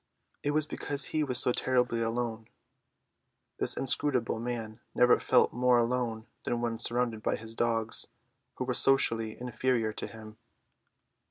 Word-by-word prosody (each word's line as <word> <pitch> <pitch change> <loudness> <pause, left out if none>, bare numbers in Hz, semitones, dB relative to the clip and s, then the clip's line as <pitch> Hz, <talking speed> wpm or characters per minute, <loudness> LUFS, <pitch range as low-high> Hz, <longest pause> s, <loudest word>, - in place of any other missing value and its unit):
It 145 - -1
was 150 0 +1
because 145 -2 -3
he 155 - +2
was 130 -4 0
so 125 - +3
terribly 125 -2 +1
alone. 115 -1 -2 1.1
This - - 0
inscrutable 130 -3 +1
man 115 -2 -5 0.2
never 125 0 +5
felt - - +3
more 125 0 +3
alone 120 -2 0 0.2
than 120 - -1
when 115 -1 -2
surrounded 120 -2 0
by - - 0
his 110 0 -8
dogs. 115 -1 0 0.5
They 130 - -2
were 125 - -1
socially 115 -4 +2
inferior 125 -2 0
to - - -5
him. 110 -1 -12
120 Hz, 145 wpm, -30 LUFS, 115-125 Hz, 1.1 s, never